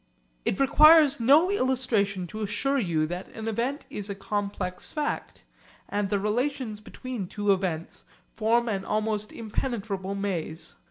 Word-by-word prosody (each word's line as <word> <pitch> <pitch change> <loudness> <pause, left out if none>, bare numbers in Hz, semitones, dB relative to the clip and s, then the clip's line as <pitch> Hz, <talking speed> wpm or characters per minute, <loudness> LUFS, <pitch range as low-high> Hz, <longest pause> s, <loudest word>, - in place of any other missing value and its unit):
It - - 0
requires 300 +1 +7
no 295 +10 +5
illustration 240 - +1
to 215 +5 -7
assure 270 +7 0
you 165 -8 +1
that 175 +4 -5
an 220 0 -5
event 240 +6 -2
is 205 0 -5
a 200 - -3
complex 195 -2 -3
fact, 300 -1 -3 0.4
and 205 -1 -1
the 205 - +1
relations 230 +2 -1
between 230 -1 -6
two 205 +1 +1
events 175 -4 -3 0.3
form 235 +2 +2
an 195 -4 -1
almost 215 0 -1
impenetrable 205 -4 -3
maze. 170 -5 -3
210 Hz, 140 wpm, -27 LUFS, 195-255 Hz, 0.4 s, requires